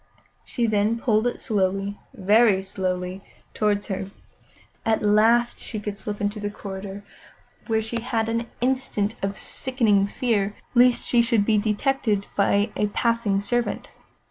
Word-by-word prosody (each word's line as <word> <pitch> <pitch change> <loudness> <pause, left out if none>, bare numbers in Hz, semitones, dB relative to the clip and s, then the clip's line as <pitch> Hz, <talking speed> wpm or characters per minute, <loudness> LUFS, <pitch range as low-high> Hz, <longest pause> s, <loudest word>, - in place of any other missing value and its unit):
Then 220 -2 +2
she 230 - -8
pulled 220 -1 +2
it 245 - -3
slowly, 195 -1 -1 0.2
very 205 -1 +4
slowly, 185 -1 -3 0.3
towards 205 -1 +1
her. 195 -2 -4 0.7
At 220 -1 +1
last 225 +3 +3
she 215 - -5
could 210 -1 -5
slip 205 0 -5
into 205 +1 -2
the 205 0 -3
corridor, 200 0 -7 0.6
where 220 -1 +1
she 230 +1 -3
had 225 -2 -1
an 230 +1 -1
instant 250 -5 0
of 195 0 -2
sickening 220 -7 +1
fear 205 -2 0 0.2
lest 245 0 +5
she 240 - +3
should 230 -3 +2
be 215 -1 +3
detected 215 -1 0
by 205 +1 +2
a 210 - +1
passing 225 -2 +1
servant. 240 +3 -1
210 Hz, 145 wpm, -24 LUFS, 200-235 Hz, 0.7 s, lest